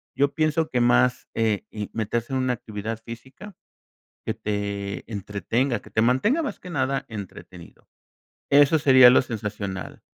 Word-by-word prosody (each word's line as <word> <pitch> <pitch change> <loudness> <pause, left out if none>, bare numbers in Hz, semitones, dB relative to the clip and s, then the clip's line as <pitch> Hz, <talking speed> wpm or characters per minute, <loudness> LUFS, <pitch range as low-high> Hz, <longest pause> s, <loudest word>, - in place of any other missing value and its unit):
Yo 140 +2 +1
pienso 155 0 +1
que 125 - 0
más, 125 +1 +3
eh, 110 -3 0
y 105 -1 -5
meterse 115 +2 -2
en 130 - +1
una 130 -1 +1
actividad 110 0 -6
física 130 - -11 0.7
que - - -1
te 100 0 -4
entretenga, 105 +5 -1
que - - -15
te 110 - +1
mantenga 170 - +2
más 285 - -5
que 180 - -10
nada 135 -2 -1
entretenido. 95 -4 -10 0.6
Eso 145 +2 +5
sería 130 -4 +7
lo 130 - +5
sensacional. 105 -5 -6
120 Hz, 150 wpm, -24 LUFS, 105-135 Hz, 0.7 s, sería